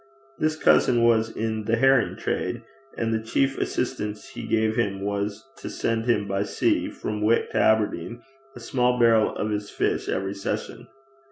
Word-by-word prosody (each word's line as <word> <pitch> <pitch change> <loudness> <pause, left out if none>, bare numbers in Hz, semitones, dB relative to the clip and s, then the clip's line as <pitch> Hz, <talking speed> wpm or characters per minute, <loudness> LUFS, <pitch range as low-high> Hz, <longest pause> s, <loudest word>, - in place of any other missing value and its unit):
This 155 0 +1
cousin 120 -5 +4
was 115 -1 +3
in 110 -1 -3
the 115 +1 +2
herring 135 +1 +3
trade, 115 +6 -3 0.3
and 115 -1 -1
the 110 - 0
chief 135 +4 0
assistance 105 -4 -3
he - - -8
gave 110 0 +1
him 100 -5 -1
was 100 +3 -3
to - - -7
send 115 0 -1
him 115 -4 +1
by 95 0 -1
sea, 105 - 0
from 105 0 -5
Wick 110 +2 +2
to - - -2
Aberdeen, 110 0 +1 0.3
a - - -9
small 125 +1 +1
barrel 115 -2 +4
of 105 - -2
his 105 0 -3
fish - - -1
every 95 +1 -2
session. 100 -1 -5
110 Hz, 170 wpm, -25 LUFS, 105-120 Hz, 0.3 s, cousin